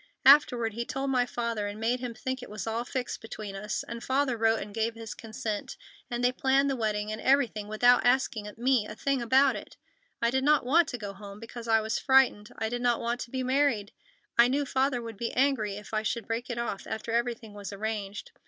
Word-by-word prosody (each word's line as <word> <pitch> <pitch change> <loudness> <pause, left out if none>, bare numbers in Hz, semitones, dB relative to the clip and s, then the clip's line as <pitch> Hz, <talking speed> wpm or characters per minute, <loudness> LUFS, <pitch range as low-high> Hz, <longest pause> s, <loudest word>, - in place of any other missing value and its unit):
Afterward, 245 -5 +6
he 235 +2 -2
told 270 +3 -3
my 250 -2 +2
father 230 -4 -2
and 205 +1 -6
made 235 +3 0
him 245 -2 -5
think 260 +1 -4
it 250 - -9
was 210 -1 -5
all 225 +1 -1
fixed 250 0 -4
between 215 -2 -7
us 205 0 -3
and 235 0 -6
Father 265 -1 +1
wrote 225 0 +2
and 205 - -7
gave 225 +1 -1
his 225 -1 -7
consent, 220 -1 -5 0.3
and 240 -1 -3
they 250 - +4
planned 270 +2 +2
the - - 0
wedding 215 -2 -1
and 215 - -5
everything 250 -6 +2
without 245 +4 +4
asking 245 -4 +1
me 245 -2 +2
a 215 - -8
thing 275 +2 0
about 260 +3 +4
it. - - -9 0.4
I 235 0 +2
did 265 +1 +1
not 295 -2 +4
want 320 +5 +4
to 245 - -4
go 205 -3 -6
home, 200 0 -10
because 230 +1 -9
I 225 -1 +4
was 220 +1 -1
frightened. 260 -6 +3
I 220 - -1
did 240 +2 -3
not 240 -1 +2
want 235 +1 -2
to 235 - -6
be 260 +1 -2
married. 255 -6 +1 0.5
I 235 - +8
knew 280 +3 0
Father 265 -2 0
would 225 -3 -7
be 230 +2 -3
angry 250 -7 +1
if 210 +2 -10
I 215 - +1
should 220 0 -2
break 230 +2 -3
it 240 - -3
off 235 -4 -3
after 220 +1 -4
everything 235 -2 -1
was 205 -1 -7
arranged. 205 -1 -4
235 Hz, 225 wpm, -28 LUFS, 215-260 Hz, 0.5 s, I